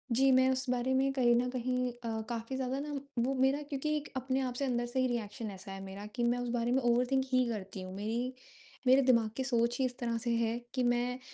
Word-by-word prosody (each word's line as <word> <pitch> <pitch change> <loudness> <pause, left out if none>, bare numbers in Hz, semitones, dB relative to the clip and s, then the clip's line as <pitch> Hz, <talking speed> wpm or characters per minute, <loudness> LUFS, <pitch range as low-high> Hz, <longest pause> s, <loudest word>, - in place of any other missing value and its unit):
जी, 270 +1 +5
मैं 260 0 +5
उस 260 0 0
बारे 250 +1 +1
में 270 +1 +3
कहीं 245 -3 +4
न 245 +1 +2
कहीं 250 0 -1
अ, 230 -2 -4
काफ़ी 230 +2 -3
ज़्यादा 265 +1 -2
ना 295 +1 -4 0.3
वो 270 - +1
मेरा 265 +2 +2
क्योंकि 305 +1 -1
एक 295 - -6
अपने 260 +1 0
आप 255 -2 -2
से 275 +2 -1
अंदर 240 -2 0
से 240 +2 -2
ही 255 - +3
रिएक्शन 225 -2 -3
ऐसा 195 +1 -9
है 195 0 -6
मेरा 195 +1 -7
कि 240 - 0
मैं 240 +1 +2
उस 245 0 -3
बारे 235 0 0
में 265 +1 +3
ओवरथिंक 250 +2 +2
ही 255 0 +4
करती 195 -3 -5
हूँ, 185 0 -7
मेरी 230 +5 -2 0.5
मेरे 265 +2 +7
दिमाग 235 -4 +4
की 265 - 0
सोच 240 -2 +1
ही 265 - +3
इस 250 0 -3
तरह 235 -1 -1
से 235 +1 -2
है 230 0 +1 0.2
कि 255 - 0
मैं 245 +1 +1
245 Hz, 250 wpm, -32 LUFS, 235-260 Hz, 0.5 s, मेरे